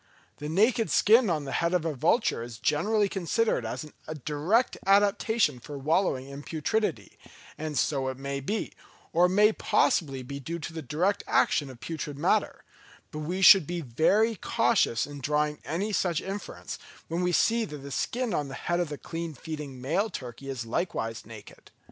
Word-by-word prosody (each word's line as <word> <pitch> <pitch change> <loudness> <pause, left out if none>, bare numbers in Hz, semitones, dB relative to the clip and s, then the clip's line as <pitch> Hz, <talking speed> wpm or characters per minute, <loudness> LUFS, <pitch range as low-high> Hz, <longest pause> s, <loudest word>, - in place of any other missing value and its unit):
The 150 - -5
naked 220 +6 +2
skin 225 +1 +5
on 155 -4 0
the 135 - -5
head 170 +2 +1
of 170 -2 0
a 160 - 0
vulture 160 - +1
is 115 -1 -7
generally 205 - +1
considered 195 +4 0
as - - -5 0.2
a 155 - -5
direct 155 - +1
adaptation 200 - +3
for 145 +4 -8
wallowing 145 -2 +1
in 140 +1 -8
putridity; 165 +9 -2 0.4
and 155 -2 -4
so 135 -1 +1
it 130 -1 -3
may 140 0 -4
be, 205 +11 -3 0.4
or 175 +2 +5
it 185 - -2
may 210 +1 +6
possibly 145 -12 +1
be 140 +3 -6
due 165 +5 -5
to 165 0 -7
the 160 - -5
direct 175 +7 0
action 145 -3 +2
of 125 -2 -12
putrid 150 -3 -5
matter; - - +1 0.5
but 155 - -6
we 180 +5 -2
should 190 -6 +9
be 175 0 -3
very 175 - +2
cautious 210 - +1
in 145 0 -9
drawing 150 +1 0
any 185 - -2
such 175 -5 +1
inference, 195 +1 -6 0.3
when 170 +2 -2
we 180 0 +1
see 230 +6 +3
that 150 -9 -6
the 140 0 -9
skin 240 - -1
on 145 -3 -1
the 135 - -7
head 175 +4 -1
of 175 -3 -1
the 145 - -5
clean 165 0 -6
feeding 150 -3 -7
male 165 - 0
turkey 130 - -8
is 130 -3 -4
likewise 115 -3 -3
naked. 110 -3 -13
160 Hz, 185 wpm, -28 LUFS, 140-195 Hz, 0.5 s, should